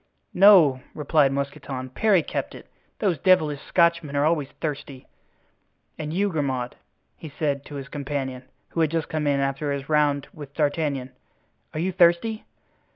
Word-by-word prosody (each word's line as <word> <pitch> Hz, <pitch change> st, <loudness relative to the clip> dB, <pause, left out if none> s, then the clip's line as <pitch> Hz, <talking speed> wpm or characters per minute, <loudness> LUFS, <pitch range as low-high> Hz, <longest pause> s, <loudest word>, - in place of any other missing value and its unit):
"No," 180 Hz, -9 st, +6 dB
replied 150 Hz, -2 st, +2 dB
Mousqueton, 135 Hz, -1 st, -4 dB
"Parry 200 Hz, 0 st, +3 dB
kept -, -, -4 dB
it. -, -, -12 dB, 0.3 s
Those 185 Hz, -7 st, 0 dB
devilish 155 Hz, -6 st, +3 dB
Scotchmen 170 Hz, -3 st, +1 dB
are 140 Hz, +1 st, +2 dB
always 155 Hz, -4 st, +1 dB
thirsty. 145 Hz, -4 st, -5 dB, 0.9 s
And 155 Hz, -1 st, -5 dB
you, 200 Hz, +5 st, +1 dB
Grimaud," 130 Hz, -6 st, -2 dB, 0.4 s
he 160 Hz, -, -10 dB
said 140 Hz, -1 st, -2 dB
to 145 Hz, -, -9 dB
his 140 Hz, -1 st, -6 dB
companion, 135 Hz, -3 st, -4 dB, 0.2 s
who -, -, -4 dB
had 160 Hz, -, +3 dB
just 165 Hz, -1 st, -2 dB
come 155 Hz, -2 st, -2 dB
in 140 Hz, -1 st, +2 dB
after 140 Hz, +1 st, -1 dB
his 140 Hz, 0 st, -4 dB
round 145 Hz, -2 st, +2 dB
with 145 Hz, -2 st, -11 dB
D'Artagnan, 145 Hz, -4 st, -1 dB, 0.6 s
"are -, -, -2 dB
you 185 Hz, +3 st, 0 dB
thirsty?" 180 Hz, +5 st, +2 dB
150 Hz, 155 wpm, -24 LUFS, 140-165 Hz, 0.9 s, No